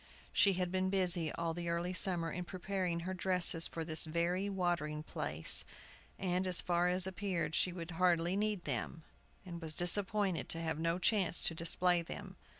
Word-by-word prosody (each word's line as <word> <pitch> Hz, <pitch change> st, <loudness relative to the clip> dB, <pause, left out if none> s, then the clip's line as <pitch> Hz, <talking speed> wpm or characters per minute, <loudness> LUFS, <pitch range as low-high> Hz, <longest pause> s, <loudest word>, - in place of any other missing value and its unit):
She 200 Hz, -, +4 dB
had 180 Hz, -1 st, -2 dB
been 185 Hz, 0 st, 0 dB
busy 180 Hz, -4 st, 0 dB
all 165 Hz, -1 st, -2 dB
the 170 Hz, 0 st, -4 dB
early 170 Hz, +2 st, -2 dB
summer 175 Hz, -3 st, +2 dB
in 180 Hz, -, -4 dB
preparing 180 Hz, -1 st, -3 dB
her 185 Hz, +2 st, -4 dB
dresses 180 Hz, -2 st, +3 dB
for 165 Hz, -1 st, -5 dB
this 155 Hz, -1 st, -2 dB
very 170 Hz, +5 st, -1 dB
watering 175 Hz, -5 st, -2 dB
place, 75 Hz, -, +1 dB, 0.5 s
and, 185 Hz, 0 st, -1 dB
as 180 Hz, -1 st, +5 dB
far 175 Hz, 0 st, +1 dB
as 180 Hz, +1 st, +1 dB
appeared, 185 Hz, -3 st, -3 dB
she 180 Hz, -, +1 dB
would 170 Hz, -1 st, -7 dB
hardly 175 Hz, +1 st, +1 dB
need 210 Hz, -2 st, -1 dB
them, 145 Hz, +4 st, -4 dB, 0.4 s
and 170 Hz, -2 st, -8 dB
was 155 Hz, -2 st, -4 dB
disappointed 195 Hz, +1 st, +2 dB
to 165 Hz, -, +3 dB
have 160 Hz, -2 st, -3 dB
no 165 Hz, +1 st, 0 dB
chance 185 Hz, -2 st, +2 dB
to -, -, +1 dB
display 170 Hz, +2 st, +1 dB
them. 165 Hz, -, -8 dB
175 Hz, 175 wpm, -34 LUFS, 165-185 Hz, 0.5 s, as